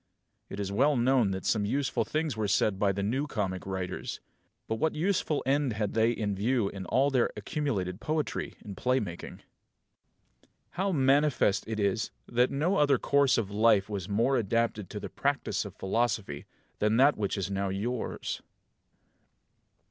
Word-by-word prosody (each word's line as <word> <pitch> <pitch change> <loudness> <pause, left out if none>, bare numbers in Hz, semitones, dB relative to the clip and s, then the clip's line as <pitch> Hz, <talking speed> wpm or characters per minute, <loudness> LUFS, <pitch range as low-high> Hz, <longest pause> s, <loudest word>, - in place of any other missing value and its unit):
It 100 - -6
is 100 -1 -2
well 140 +8 +3
known 120 -3 +3
that 95 0 -4
some 110 -2 +2
useful 130 +2 0
things 155 +3 -2
were 110 -1 -1
said 100 0 +1
by 100 -1 +3
the 100 +1 -3
New 130 +8 -1
Comic 95 -8 -3
Writers; 95 -2 -4 0.5
but 110 - -1
what 160 +7 0
useful 160 -3 0
end 135 -2 +1
had 105 -2 -2
they 115 +1 +3
in 110 -3 -1
view 110 +1 +1
in 95 -2 -7
all 140 +2 +2
their 125 -3 +2
accumulated 105 -6 -2
poetry 155 0 -2
and 100 -2 -7
playmaking? 125 -9 -1
7. - - -9 1.3
How 195 +2 -1
manifest 135 - +2
it 110 -1 -3
is 100 +2 0 0.2
that 125 +1 +2
no 165 +8 +1
other 145 -2 +4
course 140 +1 +3
of 105 -3 -1
life 105 -1 +3
was 100 -3 -4
more 115 +6 +2
adapted 115 -2 0
to - - -5
the - - -5
practice - - -1
of - - -9
philosophy 95 -7 -1 0.3
than 105 +2 +2
that 140 +3 +5
which 105 -1 -2
now 100 0 -1
is 95 - -3
yours. 120 +4 -3
115 Hz, 165 wpm, -29 LUFS, 100-135 Hz, 1.3 s, that